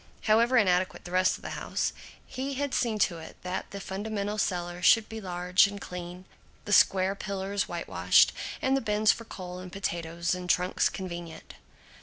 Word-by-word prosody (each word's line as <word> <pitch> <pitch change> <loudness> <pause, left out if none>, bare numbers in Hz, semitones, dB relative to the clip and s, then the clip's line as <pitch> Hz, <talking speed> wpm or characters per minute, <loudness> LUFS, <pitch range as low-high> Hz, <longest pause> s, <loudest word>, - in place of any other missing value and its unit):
However 235 +4 +4
inadequate 185 -4 +2
the 175 - -8
rest 185 0 +2
of - - -20
the - - -5
house, - - -2 0.3
he 270 +1 -4
had 280 0 -2
seen 230 -3 +1
to 170 -3 -7
it 160 - -11
that 180 +1 -4
the 200 - -7
fundamental 205 +1 -3
cellar 175 -2 -2
should 220 +4 +5
be 220 0 -7
large 180 0 +3
and 200 0 -7
clean, 180 0 -8 0.4
the 205 - -1
square 190 -1 +5
pillars 200 0 -3
whitewashed, - - +3 0.3
and 265 +1 +3
the 270 - +1
bins 215 0 +3
for 230 - -6
coal 180 -3 -8
and 185 -1 -9
potatoes 170 -3 -2
and 180 0 -5
trunks 180 +1 +2
convenient. 175 -3 -7
190 Hz, 175 wpm, -28 LUFS, 180-215 Hz, 0.4 s, should